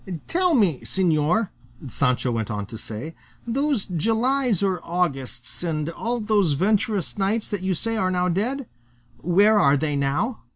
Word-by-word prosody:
"Tell 360 Hz, -1 st, +2 dB
me, 190 Hz, -, +3 dB
señor," 175 Hz, +3 st, +1 dB, 0.4 s
Sancho 125 Hz, 0 st, 0 dB
went 115 Hz, -2 st, -2 dB
on 105 Hz, -2 st, -3 dB
to 110 Hz, -, -10 dB
say, 115 Hz, +9 st, -6 dB, 0.3 s
"those 270 Hz, -1 st, 0 dB
Julys 225 Hz, -, +1 dB
or 190 Hz, -2 st, 0 dB
Augusts, 140 Hz, -9 st, -2 dB
and 160 Hz, -2 st, -2 dB
all 235 Hz, +7 st, -3 dB
those 210 Hz, -7 st, +2 dB
venturous 205 Hz, +4 st, 0 dB
knights 205 Hz, +3 st, 0 dB
that 205 Hz, -3 st, -3 dB
you 190 Hz, -1 st, 0 dB
say 225 Hz, +6 st, 0 dB
are 185 Hz, -3 st, +1 dB
now 180 Hz, -1 st, +1 dB
dead 230 Hz, +9 st, -1 dB, 0.5 s
where 200 Hz, +6 st, +4 dB
are 140 Hz, -5 st, +4 dB
they 150 Hz, 0 st, -1 dB
now?" 140 Hz, -, -1 dB
185 Hz, 155 wpm, -23 LUFS, 150-220 Hz, 0.5 s, where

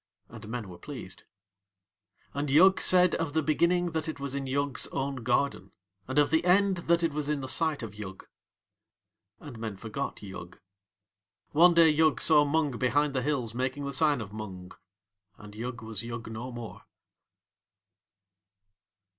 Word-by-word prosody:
And 115 Hz, -2 st, -11 dB
men 115 Hz, -3 st, -4 dB
were 90 Hz, -2 st, -11 dB
pleased. 125 Hz, -10 st, -9 dB, 1.1 s
And 145 Hz, +1 st, -2 dB
Yug 185 Hz, +7 st, +6 dB
said 180 Hz, -2 st, +4 dB
of 165 Hz, -3 st, -2 dB
the 160 Hz, 0 st, +1 dB
Beginning 170 Hz, +3 st, +2 dB
that 160 Hz, 0 st, -3 dB
it 155 Hz, -, -6 dB
was 140 Hz, -1 st, -4 dB
in 140 Hz, -1 st, -3 dB
Yug's 140 Hz, 0 st, -1 dB
own 135 Hz, 0 st, -3 dB
garden, 120 Hz, -4 st, -1 dB, 0.3 s
and 130 Hz, +2 st, -4 dB
of 145 Hz, -, +4 dB
the 160 Hz, +1 st, +3 dB
End 190 Hz, +2 st, +3 dB
that 170 Hz, 0 st, +4 dB
it 165 Hz, -3 st, +1 dB
was 150 Hz, -1 st, -3 dB
in 150 Hz, -2 st, -1 dB
the 130 Hz, -, -5 dB
sight 155 Hz, -1 st, 0 dB
of 110 Hz, -3 st, -6 dB
Yug. 100 Hz, -2 st, -9 dB, 1.1 s
And 135 Hz, -7 st, -10 dB
men 110 Hz, -3 st, -5 dB
forgot 110 Hz, 0 st, -5 dB
Yug. 95 Hz, -3 st, -9 dB, 0.9 s
One 170 Hz, +3 st, +6 dB
day 165 Hz, -1 st, +7 dB
Yug 155 Hz, 0 st, +3 dB
saw 150 Hz, -2 st, +5 dB
Mung 145 Hz, -5 st, 0 dB
behind 140 Hz, +4 st, +1 dB
the 130 Hz, -, 0 dB
hills 130 Hz, -6 st, -1 dB
making 130 Hz, +3 st, -2 dB
the 140 Hz, -, -4 dB
sign 145 Hz, -2 st, +3 dB
of 100 Hz, -1 st, -8 dB
Mung. 95 Hz, -4 st, -8 dB, 0.7 s
And 105 Hz, -1 st, -12 dB
Yug 120 Hz, +2 st, -6 dB
was 110 Hz, -1 st, -4 dB
Yug 115 Hz, -1 st, -7 dB
no 120 Hz, +3 st, -6 dB
more. 120 Hz, -2 st, -9 dB
140 Hz, 165 wpm, -28 LUFS, 115-155 Hz, 1.1 s, day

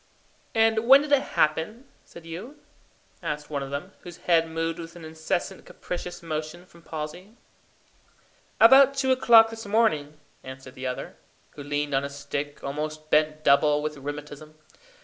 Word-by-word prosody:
"And 225 Hz, 0 st, +2 dB
when 275 Hz, +2 st, +8 dB
did 300 Hz, -, -7 dB
it 285 Hz, -2 st, +5 dB, 0.2 s
happen, 160 Hz, -, 0 dB, 0.2 s
said 170 Hz, -, -14 dB
you?" 195 Hz, -, -9 dB, 0.6 s
asked 150 Hz, 0 st, -5 dB
one 145 Hz, -1 st, -2 dB
of 135 Hz, -, -6 dB
them, 145 Hz, +7 st, -5 dB
whose 175 Hz, -2 st, -11 dB
head 165 Hz, -2 st, +2 dB
moved 165 Hz, +1 st, -3 dB
with 165 Hz, 0 st, -9 dB
an 170 Hz, -2 st, -10 dB
incessant 160 Hz, +4 st, -3 dB
capricious 175 Hz, 0 st, -7 dB
motion 155 Hz, +2 st, -5 dB
from 170 Hz, -2 st, -19 dB
palsy. 165 Hz, +8 st, -8 dB, 1.2 s
"About 270 Hz, +4 st, +7 dB
two 265 Hz, -1 st, +1 dB
o'clock 230 Hz, -3 st, +6 dB
this 225 Hz, -2 st, -8 dB
morning," 180 Hz, -9 st, +1 dB, 0.3 s
answered 130 Hz, 0 st, -10 dB
the 130 Hz, 0 st, -5 dB
other, 125 Hz, -, -6 dB, 0.3 s
who 145 Hz, -, -11 dB
leaned 145 Hz, 0 st, -3 dB
on 135 Hz, +1 st, +1 dB
a 140 Hz, -, -4 dB
stick, 145 Hz, +1 st, -6 dB
almost 155 Hz, +2 st, -5 dB
bent 155 Hz, 0 st, +2 dB
double 150 Hz, +1 st, +4 dB
with 155 Hz, 0 st, -3 dB
rheumatism. 145 Hz, +2 st, -8 dB
160 Hz, 155 wpm, -25 LUFS, 150-200 Hz, 1.2 s, when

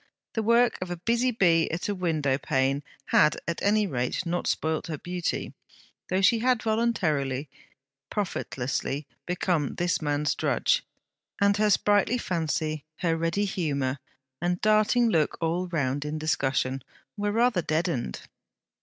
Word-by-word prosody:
The 225 Hz, -, 0 dB
work 235 Hz, +2 st, +3 dB
of 175 Hz, -1 st, -5 dB
busy 235 Hz, +2 st, +2 dB
bee 175 Hz, -8 st, +3 dB
at 165 Hz, +2 st, -3 dB
a 205 Hz, -, 0 dB
window 155 Hz, -7 st, 0 dB
pane 135 Hz, 0 st, +1 dB, 0.3 s
had 150 Hz, -, +5 dB
at 170 Hz, -, -2 dB
any 210 Hz, +1 st, +3 dB
rate 125 Hz, +1 st, -2 dB
not 175 Hz, +1 st, -1 dB
spoilt 160 Hz, 0 st, -1 dB
her 155 Hz, -2 st, -4 dB
beauty, 175 Hz, +2 st, -3 dB, 0.6 s
though 185 Hz, +2 st, +1 dB
she 225 Hz, +4 st, +5 dB
had 250 Hz, 0 st, +2 dB
voluntarily, 155 Hz, -, 0 dB, 0.6 s
profitlessly, 140 Hz, -, -2 dB, 0.2 s
become 175 Hz, -4 st, 0 dB
this 175 Hz, -1 st, 0 dB
man's 145 Hz, 0 st, 0 dB
drudge, -, -, +1 dB, 0.6 s
and 200 Hz, 0 st, +4 dB
her 215 Hz, 0 st, +3 dB
sprightly 205 Hz, +3 st, +3 dB
fancy, 160 Hz, -, -2 dB, 0.2 s
her 165 Hz, -3 st, +2 dB
ready 165 Hz, +5 st, 0 dB
humour 140 Hz, -8 st, -1 dB, 0.4 s
and 175 Hz, +1 st, 0 dB
darting 215 Hz, +3 st, +4 dB
look 160 Hz, -8 st, +1 dB
all 170 Hz, +2 st, -1 dB
round 145 Hz, -5 st, -1 dB
in 150 Hz, +1 st, -3 dB
discussion, 135 Hz, -3 st, 0 dB, 0.3 s
were 205 Hz, 0 st, -1 dB
rather 230 Hz, -3 st, +2 dB
deadened. 155 Hz, -, -1 dB
170 Hz, 135 wpm, -27 LUFS, 150-205 Hz, 0.6 s, had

